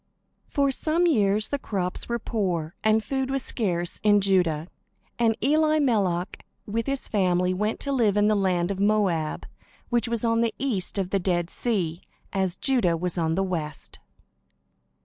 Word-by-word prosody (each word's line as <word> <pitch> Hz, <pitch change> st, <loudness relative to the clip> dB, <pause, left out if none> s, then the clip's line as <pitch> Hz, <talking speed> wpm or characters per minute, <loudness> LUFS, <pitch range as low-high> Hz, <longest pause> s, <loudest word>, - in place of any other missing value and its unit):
For 280 Hz, -1 st, +1 dB
some 320 Hz, +6 st, 0 dB
years 215 Hz, -, +2 dB
the 285 Hz, -, -1 dB
crops 185 Hz, -5 st, -3 dB
were 235 Hz, -, 0 dB
poor, 180 Hz, -8 st, -2 dB
and 220 Hz, 0 st, +3 dB
food 265 Hz, +4 st, -2 dB
was 270 Hz, -1 st, -1 dB
scarce 175 Hz, -7 st, -2 dB
in 205 Hz, -1 st, +5 dB
Judah; 175 Hz, -5 st, +1 dB, 0.5 s
and 225 Hz, -2 st, +2 dB
Elimelech 270 Hz, -, +1 dB, 0.2 s
with 225 Hz, +2 st, -2 dB
his 275 Hz, -1 st, -2 dB
family 180 Hz, -3 st, +1 dB
went 210 Hz, +4 st, -1 dB
to 280 Hz, -, -3 dB
live 225 Hz, -7 st, +2 dB
in 205 Hz, 0 st, +4 dB
the 215 Hz, -, +4 dB
land 185 Hz, -3 st, +1 dB
of 195 Hz, -, -4 dB
Moab, 195 Hz, -7 st, +1 dB, 0.4 s
which 240 Hz, 0 st, +1 dB
was 235 Hz, 0 st, -1 dB
on 230 Hz, 0 st, +2 dB
the 230 Hz, -1 st, 0 dB
east 215 Hz, -9 st, -2 dB
of 190 Hz, -2 st, -2 dB
the 195 Hz, -, +2 dB
Dead 175 Hz, -2 st, 0 dB
Sea, 180 Hz, -8 st, -1 dB, 0.3 s
as 190 Hz, -2 st, 0 dB
Judah 205 Hz, -9 st, +2 dB
was 180 Hz, +1 st, -3 dB
on 165 Hz, -2 st, 0 dB
the 195 Hz, -, +1 dB
west. 160 Hz, -6 st, -5 dB
205 Hz, 165 wpm, -25 LUFS, 180-235 Hz, 0.5 s, in